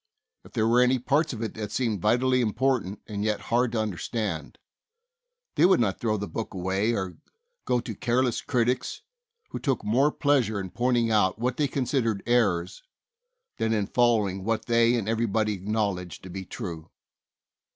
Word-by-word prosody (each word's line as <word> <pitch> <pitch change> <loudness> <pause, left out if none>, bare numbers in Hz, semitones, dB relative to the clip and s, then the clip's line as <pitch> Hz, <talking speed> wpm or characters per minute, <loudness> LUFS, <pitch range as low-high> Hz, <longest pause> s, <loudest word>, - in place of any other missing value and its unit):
If - - -17
there 110 - +1
were 120 +2 +4
any 125 +1 +4
parts 145 +5 +1
of 115 -3 -5
it 110 - -3
that 105 -2 -5
seemed 110 -5 -1
vitally 125 +4 +3
important 115 -3 0
and 105 -1 -4
yet 105 -1 0
hard 120 0 +3
to 115 - 0
understand, 105 -4 -3 1.0
they - - +2
would 185 0 +6
not 100 -5 0
throw 110 -2 0
the 100 0 -4
book 110 +4 -5
away 95 +5 0
or 95 -3 -4 0.5
go 125 - +2
to 115 -2 -6
careless 120 +3 0
critics 125 +1 -1 0.5
who - - -4
took 135 -5 -1
more 135 +8 +3
pleasure 130 -10 +1
in 95 -2 -6
pointing 120 -2 +1
out 105 -3 +3
what 125 +2 -1
they 150 - +2
considered 125 -6 -1
errors 110 - +1 0.8
than 115 0 +1
in 105 -2 +1
following 105 -5 +1
what 110 +1 -1
they 115 0 +3
and 110 -4 -2
everybody 110 -1 +1
acknowledged 100 -3 -2
to 95 - -9
be 95 +1 -6
true. 80 -4 -7
115 Hz, 170 wpm, -26 LUFS, 100-125 Hz, 1.0 s, would